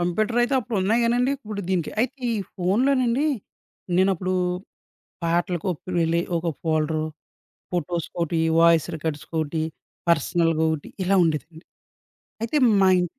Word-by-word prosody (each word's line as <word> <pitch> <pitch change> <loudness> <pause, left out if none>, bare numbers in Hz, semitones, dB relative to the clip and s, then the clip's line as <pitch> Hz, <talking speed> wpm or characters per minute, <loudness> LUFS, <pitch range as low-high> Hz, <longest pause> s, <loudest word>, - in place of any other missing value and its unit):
కంప్యూటరయితే 230 +9 +1
అప్పుడు 235 -2 -4
ఉన్నాయి 220 +5 +2
గానండి. 245 +3 +2
ఇప్పుడు 215 -6 -6
దీనికి 180 -4 0
అయితే 260 +3 -1 0.2
ఈ - - -1 0.2
ఫోనులోనండి 250 - +2 0.7
నేను 190 +1 +4
అప్పుడు 185 +2 -2 0.9
పాటలకు 175 +1 0
ఒప్ 160 - -7 0.2
వెళ్ళి 165 +1 +2 0.2
ఒక 170 - -3 0.2
ఫోల్డరు. 155 -1 0 0.7
ఫోటోస్‌కి 175 -1 -2
ఓటి 170 0 -1 0.2
వాయిస్ 170 -1 +5
రికార్డ్స్ 150 -1 -4 0.2
ఓటి 155 +1 -2 0.5
పర్సనల్‌గా 165 0 +2
ఒకటి 155 -2 -3 0.2
ఇలా 195 +2 +3
ఉండేదండి. 160 +1 -3 0.8
అయితే 230 +7 -1 0.2
మా 190 - +5
ఇం 180 - +1
175 Hz, 125 wpm, -24 LUFS, 165-220 Hz, 0.9 s, వాయిస్